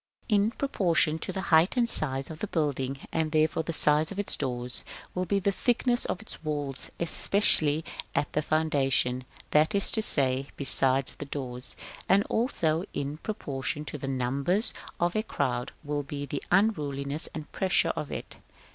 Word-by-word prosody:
In 210 -1 +3
proportion 170 - +1
to 190 - -4
the 190 - -4
height 165 +9 +5
and 240 -1 +3
size 135 - 0
of 155 - -9
the 210 - -3
building, 140 -6 -1
and 160 -1 -1
therefore 155 +1 +2
to 160 - -13
the 165 - -2
size 150 +3 +3
of 200 - -7
its 205 - 0
doors, 125 -1 -2 0.3
will 185 0 -2
be 200 - +1
the 200 +1 +1
thickness 240 +3 +1
of - - -2
its 215 - -10
walls, 145 -3 -3
especially 165 -3 +2 0.3
at 145 - 0
the 150 - +1
foundation, 135 -5 +1 0.3
that 155 +5 +3
is 200 - +3
to 220 - +2
say, 135 -7 +4
beside 135 -1 +6
the 145 - -5
doors; 130 -3 -1 0.3
and 200 +1 +5
also 170 - 0
in 145 +2 -3
proportion 150 -6 -4
to 150 - -6
the 135 - -5
numbers 135 - +1 0.3
of 175 0 0
a 215 - +2
crowd 125 - -2
will 145 -1 -2
be 145 0 -6
the 140 0 -4
unruliness 150 -8 0
and 155 -2 -7
pressure 190 0 +1
of 150 - -5
it. - - -6
150 Hz, 175 wpm, -28 LUFS, 140-185 Hz, 0.3 s, beside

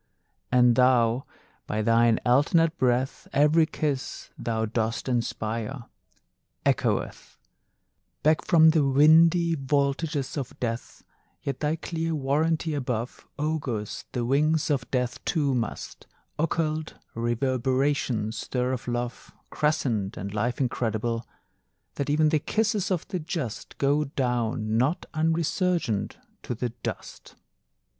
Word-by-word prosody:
And 125 -1 +5
though, 125 -1 +3 0.4
by 105 0 -1
thine 115 0 +4
alternate 155 +6 +3
breath, 125 +1 0
Every 155 +3 +4
kiss 145 -4 -3
thou 110 -1 -2
dost 115 +2 -2
inspire 115 0 -2 0.8
Echoeth - - -1 0.9
Back 155 +1 +3
from 160 -1 +6
the 155 -2 +3
windy 160 +5 +5
vaultages 140 +1 -1
of 135 -3 -5
death; 115 -1 -4 0.4
Yet 135 -2 -3
thy 150 +1 0
clear 165 0 -3
warranty 155 +3 0
above 125 -4 -3
Augurs 140 -9 -3
the 120 -2 -2
wings 150 +4 +2
of 130 -4 -1
death 125 -2 -2
too 145 -5 +1
must 120 -3 -4 0.3
Occult 155 -1 -1 0.2
reverberations 125 -1 0
stir 125 +3 -1
of 125 - -5
love 120 0 -4 0.2
Crescent 120 -10 0
and 100 +2 -5
life 115 +3 -1
incredible; 115 -2 -1 0.7
That 140 - -3
even 155 +1 +3
the 155 -1 +2
kisses 215 - 0
of 180 -4 -1
the 185 - -2
just 155 - -5
Go 145 +2 +2
down 120 -5 -1
not 145 +8 +1
unresurgent 165 - 0 0.3
to 120 - -4
the 120 +2 -2
dust. - - -7
135 Hz, 115 wpm, -26 LUFS, 120-155 Hz, 0.9 s, from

